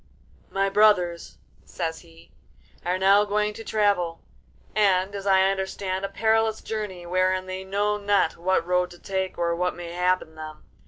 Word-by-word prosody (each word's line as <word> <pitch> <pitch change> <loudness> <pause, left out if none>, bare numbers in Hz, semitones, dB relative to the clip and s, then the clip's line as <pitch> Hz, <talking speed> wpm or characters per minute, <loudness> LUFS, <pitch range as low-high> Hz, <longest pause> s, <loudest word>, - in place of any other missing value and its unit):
'My 195 0 0
brothers,' 195 -4 +2 0.3
says 160 -1 -4
he, 80 +1 -18 0.5
'are 180 +1 0
now 195 +2 +5
going 210 0 0
to 225 - -9
travel, 200 -7 +1 0.6
and, 195 -2 +2
as 200 0 -5
I 190 0 +4
understand, 190 0 -3
a 195 - -2
perilous 220 +2 +1
journey 205 -5 -5
wherein 185 +1 +1
they 185 0 -5
know 205 +2 0
not 205 -1 +1
what 175 0 0
road 180 0 +1
to 175 - -13
take 190 -1 -3
or 170 0 0
what 180 +1 -1
may 175 -1 -7
happen 180 -2 0
them. 155 -1 -9
190 Hz, 160 wpm, -25 LUFS, 180-205 Hz, 0.6 s, now